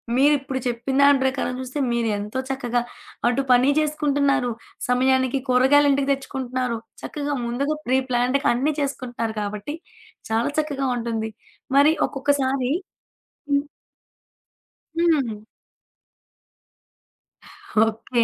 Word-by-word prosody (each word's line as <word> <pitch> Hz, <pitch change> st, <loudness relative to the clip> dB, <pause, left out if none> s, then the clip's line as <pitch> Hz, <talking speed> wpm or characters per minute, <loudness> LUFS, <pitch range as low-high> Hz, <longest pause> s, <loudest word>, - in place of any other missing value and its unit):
మీరిప్పుడు 270 Hz, -1 st, +2 dB
చెప్పిన 245 Hz, +2 st, -2 dB
దాని 280 Hz, -1 st, +6 dB
ప్రకారం 260 Hz, -1 st, 0 dB
చూస్తే 260 Hz, +3 st, -5 dB
మీరెంతో 220 Hz, -1 st, -1 dB
చక్కగా 245 Hz, -3 st, -1 dB, 0.5 s
అటు 245 Hz, +3 st, +2 dB
పనీ 250 Hz, +2 st, +5 dB
చేసుకుంటున్నారు. 285 Hz, -4 st, +1 dB, 0.4 s
సమయానికి 260 Hz, +1 st, +2 dB
కూరగాయలింటికి 280 Hz, +2 st, +4 dB
తెచ్చుకుంటున్నారు. 255 Hz, -3 st, -2 dB, 0.2 s
చక్కగా 290 Hz, -1 st, -3 dB
ముందుగా 275 Hz, +6 st, -1 dB
ప్రీ 260 Hz, +1 st, +3 dB
ప్లాన్‌డ్‌గా 250 Hz, +3 st, +1 dB
అన్ని 275 Hz, +6 st, +1 dB
చేసుకుంటున్నారు 245 Hz, -5 st, -3 dB
కాబట్టి 210 Hz, +8 st, -4 dB, 0.5 s
చాలా 225 Hz, +3 st, +1 dB
చక్కగా 280 Hz, -3 st, -1 dB
ఉంటుంది. 225 Hz, -1 st, -3 dB, 0.5 s
మరి 290 Hz, +3 st, +6 dB
ఒక్కొక్కసారి 270 Hz, -2 st, 0 dB, 0.8 s
హ్మ్. 280 Hz, 0 st, +3 dB, 1.3 s
హ్మ్. 300 Hz, -10 st, +2 dB, 2.5 s
ఓకే. 230 Hz, +2 st, 0 dB
260 Hz, 90 wpm, -23 LUFS, 240-280 Hz, 2.5 s, దాని